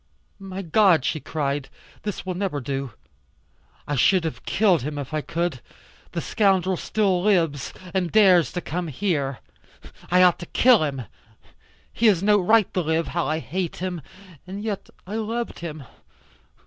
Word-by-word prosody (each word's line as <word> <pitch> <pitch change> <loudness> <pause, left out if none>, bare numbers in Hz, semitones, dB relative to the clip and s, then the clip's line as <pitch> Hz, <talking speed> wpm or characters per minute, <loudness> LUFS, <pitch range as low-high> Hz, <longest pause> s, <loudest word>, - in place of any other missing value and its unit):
"My 195 0 -6
God," 175 -4 +4
she 155 - 0
cried, 140 -2 -3 0.3
"this 210 -2 -5
will 185 - -2
never 180 -5 -2
do. 135 -2 -4 0.9
I 145 - -2
should 180 +7 +4
have 160 - -5
killed 190 -6 +3
him, 145 +3 -4
if 145 +1 -6
I 155 - 0
could. 165 -5 -2 0.5
The - - -2
scoundrel 190 -3 +2
still 190 -1 0
lives, 165 -9 +1 0.2
and 185 -3 0
dares 190 -6 +5
to 175 - -3
come 175 +1 -3
here. 145 - -2 0.7
I 180 +1 +5
ought 180 -2 +4
to 175 - -8
kill 245 -8 +5
him. 135 -4 -3 0.9
He 230 - +3
has 195 -4 +3
no 205 0 +5
right 215 +2 +3
to 185 - +1
live. 160 0 0
How 170 -1 -1
I 155 - 0
hate 165 +5 -3
him. 180 -2 -4 0.5
And 195 +3 -6
yet 210 -3 -4 0.2
I 205 +4 -4
loved 230 +2 -3
him. 155 -4 -6
180 Hz, 160 wpm, -24 LUFS, 155-195 Hz, 0.9 s, dares